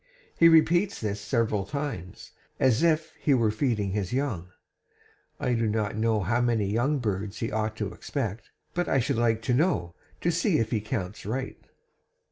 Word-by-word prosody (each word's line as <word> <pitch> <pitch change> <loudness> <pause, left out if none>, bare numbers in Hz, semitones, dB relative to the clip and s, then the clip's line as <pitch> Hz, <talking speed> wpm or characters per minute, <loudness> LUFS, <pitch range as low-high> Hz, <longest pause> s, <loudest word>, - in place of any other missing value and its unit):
He 165 - +7
repeats 175 +4 +4
this 105 -2 -3
several 105 0 0
times, 135 - -5 0.3
as 130 -1 +3
if 160 -2 +2
he 140 - +3
were 115 -4 +2
feeding 110 -4 0
his 100 -2 -2
young. 120 -11 -2 0.9
I 125 - 0
do 115 -1 +1
not 105 -1 -1
know 110 -1 +1
how 115 +6 +1
many 115 -4 +1
young 120 +9 +1
birds 105 -3 -3
he 115 0 -3
ought 110 0 -1
to 105 -2 -3
expect, 115 -7 -4 0.2
but 175 0 -1
I 135 - +3
should 115 - 0
like 115 -1 +1
to 125 - +1
know, 125 - +1 0.3
to 175 - +2
see 170 +1 +2
if 115 -1 -1
he 110 -3 0
counts 105 -3 -4
right!' 130 +5 -4
115 Hz, 175 wpm, -27 LUFS, 105-135 Hz, 0.9 s, He